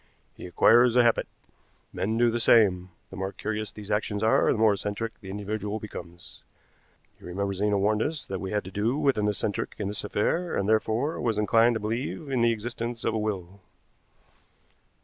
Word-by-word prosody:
He - - -9
acquires 120 +6 +5
a 125 - +6
habit. 115 -1 +2 0.7
Men 110 +4 -1
do 120 0 +3
the 120 - -1
same. 95 -6 +4 0.2
The - - -8
more 95 0 -3
curious 110 +1 -4
these 105 -1 -9
actions 105 0 -1
are, 110 - +4
the - - 0
more 110 -1 +4
eccentric 105 +3 -4
the 95 - -10
individual 105 +1 -4
becomes. 90 -5 -10 0.8
You - - -12
remember 100 +2 -2
Zena 100 +1 +1
warned 105 +2 +1
us 150 +4 -2
that 95 -1 -5
we 95 - -4
had 105 0 -1
to 95 - -9
do 110 +7 0
with 140 -6 +2
an 105 - +1
eccentric 105 0 -2
in 100 -2 -3
this 105 - -4
affair, 165 +12 -1
and 100 - -1
therefore 110 +7 0
was 115 -3 0
inclined 115 +3 +3
to - - -1
believe 120 +7 -4
in 130 -3 +1
the 115 0 +4
existence 115 +1 -4
of 115 - +1
a 110 - -1
will." 100 -3 -4
110 Hz, 190 wpm, -27 LUFS, 100-115 Hz, 0.8 s, a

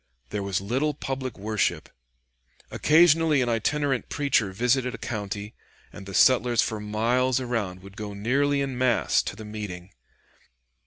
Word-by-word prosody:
There 105 - -2
was 100 -1 -1
little 130 +9 -1
public 130 -3 -4
worship. 105 +1 -1 0.8
Occasionally 160 -1 +4
an 120 - -1
itinerant 135 +4 0
preacher 140 -9 +1
visited 125 +5 0
a - - -8
county, 105 -2 -5 0.4
and 95 - -10
the 95 - -6
settlers 120 -3 +4
for 110 - -3
miles 120 +5 +1
around 110 -8 -3
would 100 0 -13
go 105 -1 -6
nearly 140 +7 +1
in 135 -2 -3
mass 125 -2 +2
to - - -6
the 110 +1 -9
meeting. 100 -4 -7
120 Hz, 145 wpm, -25 LUFS, 105-135 Hz, 0.8 s, Occasionally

